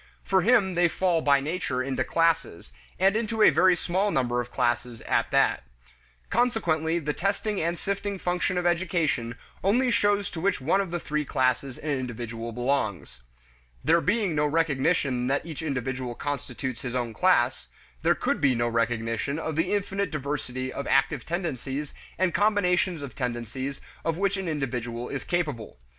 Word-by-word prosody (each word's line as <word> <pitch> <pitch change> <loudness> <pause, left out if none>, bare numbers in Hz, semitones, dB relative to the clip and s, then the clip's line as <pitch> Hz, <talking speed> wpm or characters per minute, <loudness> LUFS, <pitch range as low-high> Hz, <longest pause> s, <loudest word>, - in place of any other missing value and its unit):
For 190 -1 +2
him 205 -3 +4
they 175 0 +4
fall 175 -1 +1
by 140 -2 +4
nature 140 -4 -2
into 130 -1 -1
classes, 160 - 0 0.2
and 195 +2 +3
into 220 -1 +1
a - - +8
very 185 0 +5
small 185 +4 0
number 125 -7 +1
of 120 - -8
classes 120 -1 -1
at - - 0
that. - - +3 0.7
Consequently 170 -9 +1
the 150 -3 -2
testing 200 +3 -1
and 170 +2 -1
sifting 200 +1 -3
function 180 0 -1
of 180 - -1
education 165 -9 0 0.3
only 240 +6 +3
shows 205 -3 +2
to 160 - -5
which 200 +3 +1
one 165 +9 +2
of 175 -3 -4
three 150 0 -1
classes 130 -1 0
an 150 - -3
individual 120 -3 -4
belongs. 120 - -2 0.6
There 165 +2 +4
being 205 -2 +1
no 150 0 +2
recognition 140 -4 +1
that 140 +3 0
each 160 -3 -6
individual 130 -4 -3
constitutes 130 -3 -4
his 125 -1 -4
own 120 -2 -1
class, 130 -6 +2 0.3
there - - +3
could - - -1
be 135 -3 +4
no 120 0 +1
recognition 115 +3 -1
of 160 -1 -3
the 165 +4 0
infinite 200 -1 -1
diversity 130 -3 -3
of 140 - -4
active 135 0 +2
tendencies 150 -5 -3 0.2
and 185 -2 +1
combinations 185 -6 +2
of 140 - -7
tendencies 125 +2 -4 0.2
of 165 -1 -1
which 200 +1 +1
an 190 -2 -3
individual 125 -5 -3
is 140 - -4
capable. 150 - -2
150 Hz, 160 wpm, -27 LUFS, 125-180 Hz, 0.7 s, a